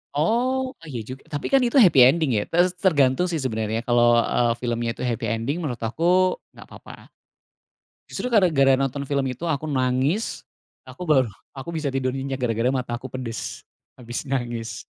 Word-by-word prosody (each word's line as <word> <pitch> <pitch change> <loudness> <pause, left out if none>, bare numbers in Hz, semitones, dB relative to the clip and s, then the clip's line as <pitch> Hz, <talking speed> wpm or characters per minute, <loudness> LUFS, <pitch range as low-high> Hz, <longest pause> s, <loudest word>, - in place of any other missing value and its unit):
Oh, 255 - +1
eh 165 - -13
iya 120 -3 -4
juga, 130 +1 -8
tapi 145 -1 -5
kan 275 - +6
itu 245 -1 0
happy 185 - +6
ending 155 +1 +2
ya. - - +1
Tes 175 +2 +2
tergantung 145 -2 +3
sih 165 -3 -2
sebenarnya 110 -3 -2
kalau, 120 -1 +4
eee, 120 -1 +1
filmnya 120 -1 -2
itu - - -6
happy 120 -3 -2
ending, 115 +7 -2
menurut 130 -9 -4
aku 175 +10 +2 0.2
enggak - - -12
apa-apa. - - -13 1.0
Justru, 250 - -4
gara-gara 140 - +4
nonton 135 +1 -2
film 140 -1 -1
itu 125 +4 -6
aku 155 -2 -2
nangis, 135 - -1 0.4
aku 180 - -8
baru, 140 -7 +3 0.2
aku 135 +4 -8
bisa 150 -3 -2
tidur 130 0 -1
nyenyak 135 0 -4
gara-gara 120 0 0
mata 125 -3 -2
aku 130 +2 -8
pedes. 120 -3 -6 0.3
Habis 120 +2 -5
nangis. 120 -4 -4
135 Hz, 170 wpm, -23 LUFS, 120-165 Hz, 1.0 s, kan